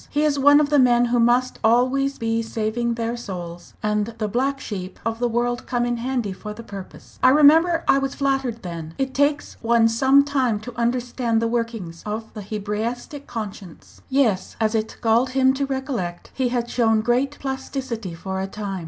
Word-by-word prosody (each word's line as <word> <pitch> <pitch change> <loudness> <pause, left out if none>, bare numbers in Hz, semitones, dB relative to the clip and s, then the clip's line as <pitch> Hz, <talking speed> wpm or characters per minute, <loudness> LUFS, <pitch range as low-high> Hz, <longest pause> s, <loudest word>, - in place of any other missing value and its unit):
He 295 +1 0
is 290 -2 +2
one 285 +2 +7
of 295 -1 +2
the 295 - +5
men 245 -1 +5
who 240 0 +1
must 245 +2 +2
always 255 +4 +2
be 225 -1 0
saving 230 +1 -2
their 230 0 -2
souls, 175 -6 -8
and 210 +1 -1
the 215 -2 -1
black 265 +6 0
sheep 190 -6 -6
of 225 0 -2
the 245 - +1
world 240 +1 -1
come 240 -1 0
in 240 0 -1
handy 240 -4 -2
for 210 +3 -8
the 230 - -9
purpose. 195 -3 -11
I - - +7
remember 320 +4 +5
I 275 - +5
was 275 0 -3
flattered 270 -4 -1
then. 165 -2 -7
It 265 -1 -2
takes 285 +1 0
one 230 0 +4
some 265 +5 +4
time 260 -6 0
to 245 +2 -8
understand 240 -1 0
the 230 - 0
workings 230 -8 -3
of 220 +1 -5
the 210 - -7
Hebraistic 215 +7 -4
conscience!" 205 -7 -8
Yes 245 -9 +1
as 220 0 +1
it 220 -1 -2
galled 235 +3 +2
him 260 0 +5
to 275 +1 -2
recollect 260 -10 -4
he 260 -2 0
had 240 -1 -1
shown 225 -3 +2
great 250 +5 0
plasticity 265 -7 -4
for 190 +3 -4
a 190 - -2
time. 195 -1 -5
235 Hz, 190 wpm, -22 LUFS, 215-265 Hz, -, one